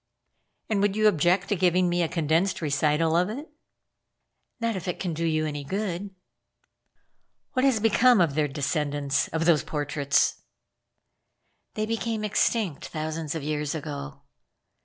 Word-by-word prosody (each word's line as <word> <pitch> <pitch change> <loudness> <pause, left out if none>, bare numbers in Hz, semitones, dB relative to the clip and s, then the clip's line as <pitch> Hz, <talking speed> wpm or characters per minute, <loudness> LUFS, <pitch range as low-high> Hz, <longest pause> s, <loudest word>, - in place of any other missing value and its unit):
"And 210 -3 0
would 205 -1 +1
you 215 0 +4
object 180 +1 +2
to 205 - +2
giving 180 0 +3
me 175 0 +1
a 170 - +2
condensed 165 +4 0
recital 155 +1 +1
of 180 +3 +2
it?" 285 +8 -7 1.1
"Not 230 -2 -1
if 185 -1 -5
it 180 - -3
can 180 -3 -2
do 165 +2 -3
you 155 -1 +1
any 145 -2 -4
good?" 195 +3 -3 1.4
"What 255 0 +2
has 260 -5 +3
become 225 +2 +4
of 165 -5 +3
their 150 0 +1
descendants 145 -1 -1
of 165 +1 -2
those 160 -5 +4
portraits?" 145 -1 0 1.3
"They 215 - -1
became 225 -1 -2
extinct 210 - 0
thousands 155 0 -4
of 160 - -4
years 150 0 -2
ago." 145 - -6
165 Hz, 145 wpm, -26 LUFS, 150-205 Hz, 1.4 s, you